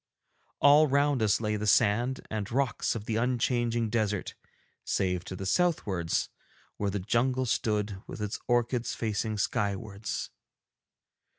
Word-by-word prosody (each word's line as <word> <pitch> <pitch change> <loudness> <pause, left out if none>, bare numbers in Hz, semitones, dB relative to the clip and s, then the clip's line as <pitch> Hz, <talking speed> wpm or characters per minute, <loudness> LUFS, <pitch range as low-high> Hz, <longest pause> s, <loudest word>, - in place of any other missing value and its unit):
All 145 +2 +7
round 140 -2 +2
us 105 -2 +3
lay 105 -1 -1
the 105 +1 -3
sand 120 +6 +2
and 105 -2 -3
rocks 130 -1 0
of 105 -2 -5
the 110 -1 -1
unchanging 120 -1 0
desert, 105 -3 -1 0.5
save 90 -2 0
to 95 - -6
the 95 - -6
southwards 100 - 0 0.5
where 100 - -1
the 100 - -2
jungle 125 +6 +1
stood 105 -5 -1
with - - -8
its 105 0 -3
orchids 120 0 +1
facing 110 -1 -2
skywards. 105 +1 -2
110 Hz, 130 wpm, -29 LUFS, 105-125 Hz, 0.5 s, All